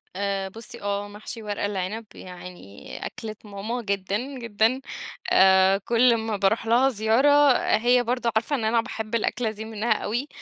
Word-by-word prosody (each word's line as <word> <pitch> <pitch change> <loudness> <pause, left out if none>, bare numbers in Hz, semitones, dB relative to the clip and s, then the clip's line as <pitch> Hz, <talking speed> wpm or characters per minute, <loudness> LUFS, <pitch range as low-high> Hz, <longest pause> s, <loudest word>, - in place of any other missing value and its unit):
آآ، 195 0 -2
بُصّي، 230 +3 -10
آه 200 0 -2
محشي 215 +2 -8
ورق 205 -1 -4
العنب 205 +2 -3
يعني 180 - -10
أكلة 215 -1 -6
ماما 210 +4 -4
جدًا، 200 -1 -1 0.2
جدًا، 230 +3 +1 0.5
آآ، 190 0 +6
كل 235 +3 +3
ما 220 -2 -3
باروح 205 +4 +1
لها 245 +4 +4
زيارة 265 +5 +4 0.2
هي 245 +2 +3
برضه 240 -1 -1
عارفة 230 +6 +1
إن 235 - -3
أنا 230 +1 +3
باحب 220 -1 -5
الأكلة 230 0 0
دي 220 0 -8
منها 220 +1 -3
أوي، 230 +5 -1
220 Hz, 155 wpm, -25 LUFS, 200-235 Hz, 0.5 s, آآ